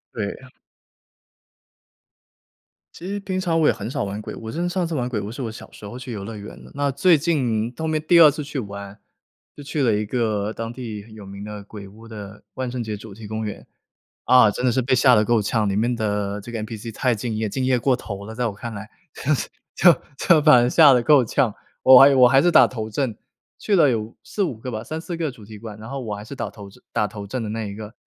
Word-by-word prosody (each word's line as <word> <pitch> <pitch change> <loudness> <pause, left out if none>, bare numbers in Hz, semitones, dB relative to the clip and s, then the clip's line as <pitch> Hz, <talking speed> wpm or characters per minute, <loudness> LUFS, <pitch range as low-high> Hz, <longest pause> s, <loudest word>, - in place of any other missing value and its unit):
对。 110 +3 -4 2.5
其 175 - -9
实 205 +1 -3
平 190 -2 -3
常 165 -3 0
我 155 - +4
也 - - +4
很 110 +2 -6
少 125 - -2
玩 100 +1 -5
鬼 - - -7
屋， - - -11
我 110 - -5
真 170 - -4
的 175 - 0
上 180 -1 -1
次 165 - -4
玩 125 -3 -1
鬼 115 - -2
屋 105 +2 -5
是 130 - -7
我 115 -3 -3
小 115 - -11
时 - - -15
候 110 +4 -7
去 125 -1 -8
游 100 -3 -5
乐 110 +2 -7
园 100 - -10
呢， - - -14
那 140 0 0
最 160 +5 +4
近 125 -8 0
后 160 0 -3
面 155 -1 0
第 170 -1 +7
2 155 - +10
次 150 +1 -4
去 145 -1 -5
玩， 100 -1 -8 0.6
就 145 - -9
去 145 +1 -3
了 120 - +3
一 105 0 -1
个 110 -2 -1
当 115 0 -5
地 115 -5 -7
有 110 -2 -11
名 100 +1 -9
的 105 -1 -7
鬼 100 -1 -10
屋 110 +3 -15
的 105 -2 -10
万 130 -1 -4
圣 120 -1 -4
节 110 -1 -4
主 105 0 -11
题 110 +1 -11
公 110 +1 -4
园。 105 - -7 0.6
啊， 125 -3 +6
真 125 - -5
的 125 - +4
是 130 +2 +1
被 130 - +1
吓 125 0 +5
得 105 0 +3
够 115 0 +2
呛， 105 +1 0
里 - - -1
面 120 +3 0
的 105 -2 -2
这 120 - -9
个 115 - -3
NPC 110 +1 -7
太 125 +1 +1
敬 110 +1 -4
业， 110 0 -2
敬 130 +5 -3
业 130 -1 +2
过 125 +1 +2
头 100 -1 -7
了， 110 - -8
在 120 +1 -1
我 110 - -2
看 110 +3 -7
来。 105 +1 -7 0.3
就 155 - -1
是 - - -3 0.3
就 170 -4 +5 0.2
就 160 -4 +4
把 150 -6 +7
人 120 - +2
吓 150 -1 +7
得 125 -2 +3
够 140 -1 +5
呛， 115 -2 0 0.3
我 130 -1 +9
还 140 +1 +9
有 135 - +2
我 125 - +8
还 135 +2 +5
是 175 0 +3
打 - - +7
头 110 -3 -6
阵。 120 -1 -2 0.4
去 205 - 0
了 160 -6 +5
有 115 -2 -2
4-5 185 - -2
个 125 +3 -6
吧， 110 0 -5
3-4 160 +4 -5
个 160 -3 -2
主 115 -4 -14
题 105 -1 -11
馆， 110 -1 -9
然 110 +2 -10
后 135 0 -5
我 105 -3 -4
还 100 - -8
是 140 - -9
打 120 -5 -4
头 100 -2 -11
阵 100 - -19
打 105 - +1
头 100 -1 -8
阵 120 +4 -4
的 110 - -4
那 110 +1 -3
一 100 - -7
个 110 +1 -9
115 Hz, 280 characters per minute, -22 LUFS, 105-135 Hz, 2.5 s, 2